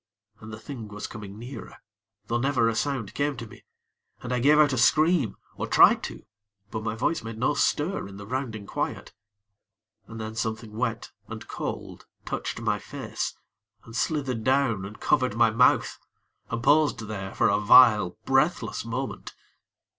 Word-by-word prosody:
And 110 - -10
the 110 - -7
thing 115 -1 -8
was 105 0 -7
coming 105 -2 -8
nearer, 120 +4 -9 0.5
though 115 +2 -1
never 130 -3 +2
a 115 - +1
sound 115 -5 -2
came 140 0 -1
to 120 - -6
me, 110 - -15 0.6
and 125 - -3
I 125 - +1
gave 145 +5 +5
out 150 -2 +5
a - - -1
scream, 155 - +3 0.2
or - - -3
tried - - +6
to; - - -9 0.5
but 110 - -3
my 110 0 -3
voice 125 +6 -1
made 110 0 -7
no 130 +6 +1
stir 150 - 0
in 100 0 -11
the 100 - -9
rounding 115 -3 -4
quiet; - - -4 0.9
and 115 0 -9
then 110 0 -5
something 110 -1 -4
wet 115 -1 -2 0.2
and - - -8
cold - - -6 0.2
touched - - -4
my - - 0
face, - - -5 0.5
and 115 - -11
slithered 130 -6 -1
down 130 -7 +1
and 105 +2 -10
covered 130 -5 +1
my 115 -1 +5
mouth, 120 +3 +3 0.5
and 115 0 -3
paused 150 -2 +3
there 100 -3 -6
for - - +3
a 100 - +2
vile, 105 -4 +6
breathless 145 +6 +1
moment. 125 +3 -5
115 Hz, 170 wpm, -26 LUFS, 110-135 Hz, 0.9 s, tried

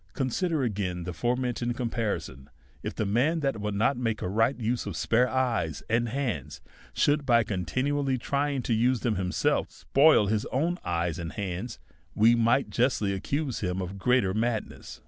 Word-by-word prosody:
Consider 150 +2 0
again 95 -6 -2
the 90 +1 -5
forementioned 120 +3 -1
comparison: 100 - -3 0.3
If - - -5
the 110 - -1
man 135 +11 +1
that 135 -7 -1
would 105 -1 -2
not 115 +6 +2
make 115 -3 -2
a - - -1
right 115 +7 +1
use 120 +1 -1
of - - -4
spare 125 +2 +2
eyes 115 - -1
and 115 +1 +2
hands 120 - -3 0.3
should, 145 0 +2
by 120 -4 +4
continually 130 - -1
trying 140 +1 -1
to 115 - 0
use 120 +2 +2
them 120 - +1
himself, 90 -1 0
spoil 140 -6 +4
his 105 +1 0
own 170 +7 -1
eyes 85 -1 -1
and 85 -1 -5
hands, 100 +4 -4 0.4
we 115 +3 +5
might 120 +3 +2
justly 120 -5 +1
accuse 140 +7 -2
him 90 -2 -2
of 90 -2 -3
still 100 +1 -9
greater 100 -2 +2
madness. 110 0 -3
115 Hz, 170 wpm, -27 LUFS, 100-130 Hz, 0.4 s, we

